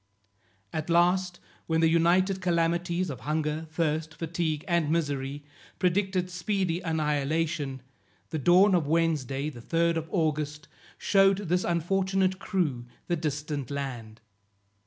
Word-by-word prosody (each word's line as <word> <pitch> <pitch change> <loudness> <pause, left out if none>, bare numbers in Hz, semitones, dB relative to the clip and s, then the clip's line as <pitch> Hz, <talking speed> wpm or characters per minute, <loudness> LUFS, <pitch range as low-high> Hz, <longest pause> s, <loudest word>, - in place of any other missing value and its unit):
At 160 +1 -3
last 175 +1 +2 0.3
when 160 0 +1
the 165 - +4
united 180 +4 +3
calamities 170 0 0
of 130 - -7
hunger, 155 +2 -2
thirst, 160 0 -1
fatigue 165 -2 -2
and 170 -4 +1
misery, 145 -3 -1 0.3
predicted 185 0 0
speedy 185 -2 -1
annihilation, 150 -3 -1 0.5
the 160 - -2
dawn 185 +7 +5
of 170 -5 +2
Wednesday, 150 -3 0
the 120 -4 -11
3d 170 +5 +1
of 160 0 -4
August, 150 -3 -1 0.3
shewed 195 -1 +4
this 180 -2 0
unfortunate 190 +2 +1
crew 150 - -1 0.2
the 175 - 0
distant 150 -3 -3
land. 125 -6 -5
165 Hz, 120 wpm, -28 LUFS, 150-180 Hz, 0.5 s, dawn